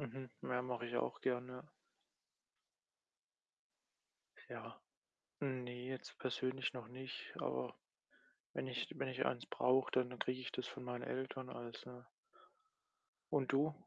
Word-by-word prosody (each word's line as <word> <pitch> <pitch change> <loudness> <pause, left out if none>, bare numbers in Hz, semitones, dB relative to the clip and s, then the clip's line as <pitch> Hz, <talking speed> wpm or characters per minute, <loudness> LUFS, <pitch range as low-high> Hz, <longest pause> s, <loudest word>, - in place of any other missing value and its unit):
Mhm, 130 -2 -4
ja, 125 0 +2
mache 125 -1 -1
ich 120 0 0
auch - - +2
gern, 125 -1 +3
ja. 125 0 -5 2.9
Ja. - - -6 0.6
Ne, 125 -2 -1
jetzt 130 -1 -4
persönlich 130 0 +2
noch 120 -3 -5
nicht, 130 +1 -5
aber 65 0 +1 0.8
wenn - - 0
ich 125 -2 0
wenn 130 - +2
ich 130 0 +2
eins 120 - +2
brauche, 130 +1 +5
dann 125 -1 +5
dann 125 - -6
kriege 130 0 +2
ich 125 - -2
das 125 - -1
von - - -5
meinen 125 -1 -2
Eltern 130 0 -1
als, 120 -1 -5
ne? 125 0 -9 1.3
Und 135 -2 +4
du? 150 +3 +6
125 Hz, 140 wpm, -42 LUFS, 125-130 Hz, 2.9 s, du